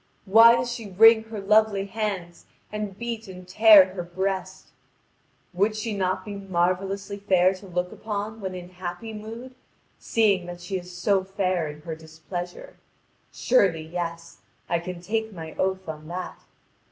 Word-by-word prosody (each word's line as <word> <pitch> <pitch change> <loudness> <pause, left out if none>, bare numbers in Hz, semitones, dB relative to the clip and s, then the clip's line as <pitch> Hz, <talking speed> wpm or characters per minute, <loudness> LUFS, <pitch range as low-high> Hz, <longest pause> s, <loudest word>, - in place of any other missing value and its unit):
Why 225 +4 +8
does 240 0 -2
she 230 -3 -6
wring 220 +3 +6
her 220 -1 -7
lovely 210 0 +3
hands 195 -5 -4 0.2
and 210 -2 -5
beat 235 -1 -5
and 185 -1 -11
tear 195 -1 +7
her 185 - -4
breast? 190 +1 -4 0.8
Would 205 +4 +1
she 215 0 -3
not 185 -1 -1
be 210 - -6
marvellously 195 +1 -1
fair 190 -2 +3
to 195 +1 -12
look 180 0 -2
upon 215 +1 -5
when 190 -1 -4
in 180 -1 -8
happy 180 +5 -7
mood, 225 +4 -8 0.5
seeing 200 -6 +2
that 175 0 -7
she 180 +2 -4
is 180 0 -11
so 195 +1 +2
fair 185 -3 -1
in 150 0 -9
her 160 +1 -6
displeasure? 175 - -8 0.5
Surely 190 -10 +2
yes, 170 0 -6 0.3
I 170 - +1
can 175 0 -7
take 220 +3 -2
my 160 -3 -8
oath 190 -1 -1
on 155 -1 -7
that. 180 +2 -7
190 Hz, 155 wpm, -25 LUFS, 175-215 Hz, 0.8 s, Why